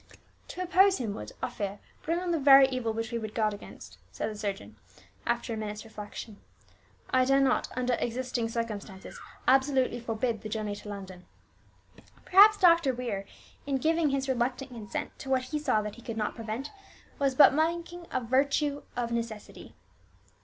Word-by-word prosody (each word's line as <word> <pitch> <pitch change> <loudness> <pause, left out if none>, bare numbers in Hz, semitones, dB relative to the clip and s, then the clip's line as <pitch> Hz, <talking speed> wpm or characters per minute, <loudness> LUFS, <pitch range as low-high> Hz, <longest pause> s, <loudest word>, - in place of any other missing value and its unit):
"To 365 - -5
oppose 375 +2 +4
him 225 -5 -3
would, 105 - -7
I - - 0
fear, 200 -1 -4 0.2
bring 330 +2 -1
on 360 -1 -2
the 330 - +1
very 275 -1 +8
evil 255 -3 -2
which 225 +1 -4
we 235 - -1
would 215 -1 -7
guard 215 -2 +1
against," 205 - -11
said - - -3
the - - -7
surgeon, 200 -2 -5 0.5
after 235 0 -1
a - - -4
minute's 210 0 -5
reflection. 210 -1 -8 0.7
"I 255 0 +4
dare 270 +1 +3
not, 270 -2 +2
under 250 0 +1
existing 245 -1 -2
circumstances, 215 -4 -5 0.3
absolutely 265 -1 +3
forbid 230 -1 -2
the 215 - -6
journey 215 -1 -3
to 210 - -10
London." 190 -3 -9 1.0
Perhaps 415 +3 +7
Dr. 335 -8 +5
Weir, 225 -6 -3 0.4
in 275 -1 +1
giving 320 +2 +2
his 275 0 -1
reluctant 255 +1 -1
consent 220 -4 -5
to 270 - -8
what 260 -1 +2
he 300 +4 -3
saw 250 -8 +1
that 210 -1 -5
he - - -12
could 230 -1 -6
not 210 -1 -1
prevent, 230 +5 -5 0.5
was 275 -2 +1
but 290 - +8
making 340 +3 -1
a - - -1
virtue 280 +4 +1 0.2
of 235 -1 -1
necessity. 230 -2 -5
245 Hz, 175 wpm, -29 LUFS, 220-275 Hz, 1.0 s, very